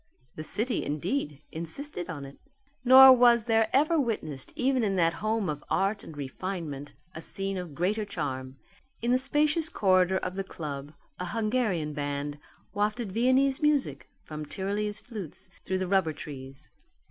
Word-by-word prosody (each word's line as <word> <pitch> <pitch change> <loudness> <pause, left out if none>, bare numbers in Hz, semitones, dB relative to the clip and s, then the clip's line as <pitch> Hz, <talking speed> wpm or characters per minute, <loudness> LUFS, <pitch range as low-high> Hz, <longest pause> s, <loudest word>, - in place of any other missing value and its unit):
The 155 - -6
city, 220 +9 -1
indeed, 150 - -2
insisted 175 - -5
on 145 -5 -5
it. 135 +1 -12 0.4
Nor 260 +1 +10
was 240 -2 +5
there 225 -1 +2
ever 310 +4 +3
witnessed 155 - -2
even 260 -1 +1
in 200 -2 +1
that 165 -2 +3
home 215 -2 0
of 150 -1 -4
art 200 +2 +1
and 155 - -10
refinement 145 0 -5 0.2
a 160 - -7
scene 195 +3 -4
of 180 -6 -6
greater 205 +7 0
charm. 135 -9 -4 0.5
In 240 - +2
the 255 - +4
spacious 300 +4 +2
corridor 185 -2 +3
of 185 -1 -3
the 195 +1 -3
club 150 -5 -7 0.3
a 180 - -3
Hungarian 215 -6 -1
band 145 0 -3 0.3
wafted 210 +1 -1
Viennese 260 - +3
music 280 - +1
from 155 -1 -7
Tyrolese 205 +6 -2
flutes 210 - -7
through 190 - -1
the 185 0 -2
rubber 185 -4 +2
trees. 135 -1 -9
190 Hz, 155 wpm, -28 LUFS, 150-235 Hz, 0.5 s, Nor